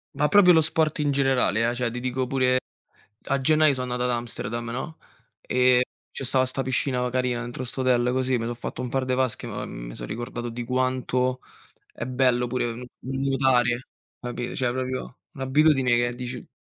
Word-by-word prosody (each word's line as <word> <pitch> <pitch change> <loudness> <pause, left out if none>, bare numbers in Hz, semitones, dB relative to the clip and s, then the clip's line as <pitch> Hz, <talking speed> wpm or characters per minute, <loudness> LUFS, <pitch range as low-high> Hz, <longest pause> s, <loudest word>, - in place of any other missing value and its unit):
Ma 150 - +2
proprio 185 -2 +7
lo 160 - +6
sport 155 -1 0
in 145 -1 +2
generale, 130 -5 +2
eh, 120 - -2
cioè 120 -2 -1
ti 125 - -4
dico 130 +1 -1
pure 130 -1 +2 0.7
a 140 0 +1
gennaio 155 +1 +4
sono 125 -1 -3
andato 125 0 -1
ad 120 - +1
Amsterdam, 120 0 -5
no, 145 +7 -5 0.4
ehm, 125 0 +3 0.3
ce 135 - -5
stava 130 +1 +2
sta 130 +1 -2
piscina 125 -1 0
carina 125 -1 0
dentro 120 +1 -5
'sto 130 +2 -5
hotel 125 -1 +3
così, 130 0 +1
me 115 - -3
so 120 - -2
fatto 120 +1 -6
un 125 - -3
par 130 +1 -1
de 130 - 0
vasche, 130 -2 -1
ma - - -4
mi - - -8
son - - -7
ricordato 120 0 -5
di 120 +1 -5
quanto 130 0 0 0.5
è 120 - -5
bello 125 -1 +2
pure 120 -1 -1
n 125 +2 -8
nuotare, 130 -2 +1 0.3
capito, 120 0 -5
cioè 125 -2 +1
proprio 130 -1 -4
un'abitudine 135 -1 +3
che 120 0 +1
dici 125 0 -6
125 Hz, 190 wpm, -25 LUFS, 120-130 Hz, 0.7 s, proprio